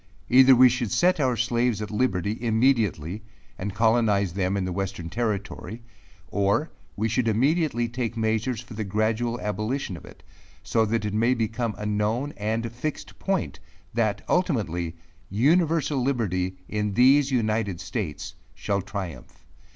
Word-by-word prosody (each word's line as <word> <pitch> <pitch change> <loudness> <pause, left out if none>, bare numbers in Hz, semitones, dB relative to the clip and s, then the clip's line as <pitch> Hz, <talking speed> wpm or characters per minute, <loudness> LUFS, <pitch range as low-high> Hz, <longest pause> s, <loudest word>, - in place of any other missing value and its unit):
Either 130 +1 +8
we 130 +1 +8
should 125 -3 -1
set 175 +9 +3
our 130 -4 +1
slaves 120 -2 +1
at 105 0 -5
liberty, 105 -3 0
immediately, 110 - +1 0.4
and 95 +1 -4
colonize 110 -5 +2
them 95 +1 0
in 95 - -1
the 90 - -3
western 95 -3 -4
territory;5 110 -2 -3 0.5
or 100 - +1 0.2
we 110 +2 0
should 115 +2 0
immediately 130 +2 +2
take 120 -1 -4
measures 110 +1 0
for 120 -1 -12
the 110 +1 -3
gradual 110 +4 0
abolition 105 +2 -2
of - - -11
it, - - -15 0.4
so 115 -1 +2
that 115 0 0
it 105 - -2
may 115 +4 +2
become 115 -1 -2
a 105 - -5
known, 105 +7 -1
and 110 +2 -2
fixed 130 +6 -5
point, 195 -2 -1 0.3
that 110 -3 0
ultimately, 100 - 0 0.3
universal 150 - +2
liberty, 95 -8 -1
in 105 -2 -2
these 135 +3 +5
united 110 -7 0
states, 95 - -4 0.2
shall 100 -1 -1
triumph. 95 - -7
110 Hz, 145 wpm, -25 LUFS, 100-125 Hz, 0.5 s, Either